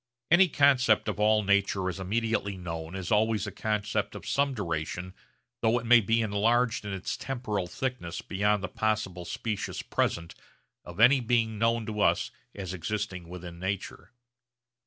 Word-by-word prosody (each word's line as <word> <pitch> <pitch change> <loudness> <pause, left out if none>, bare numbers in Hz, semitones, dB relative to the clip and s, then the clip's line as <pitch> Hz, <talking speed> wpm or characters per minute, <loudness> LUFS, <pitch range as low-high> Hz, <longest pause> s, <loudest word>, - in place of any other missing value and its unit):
Any 185 +2 +7
concept 130 -7 +4
of - - -2
all 105 0 +4
nature 100 -1 +2
as 95 +1 -3
immediately 100 0 -1
known 80 -1 -6
is 95 +3 -5
always 110 -1 +2
a 105 - -5
concept 105 -1 -2
of - - -8
some 140 -1 +1
duration 85 -2 -3 0.5
though 115 +1 +3
it 120 - -4
may 120 0 +7
be 115 +2 +2
enlarged 115 +2 +1
in 105 - -4
its 95 -2 -3
temporal 110 -8 -3
thickness 115 -6 -4
beyond 105 +1 0
the - - -1
possible 95 -3 -2
specious 105 +4 -4
present 85 0 -1 0.5
of - - -10
any 130 +4 +7
being 115 -3 0
known 115 0 +2
to 105 -1 -4
us - - +2 0.2
as 95 -3 -5
existing 95 -1 -4
within 85 -1 -8
nature. 95 +5 -4
105 Hz, 155 wpm, -28 LUFS, 95-115 Hz, 0.5 s, Any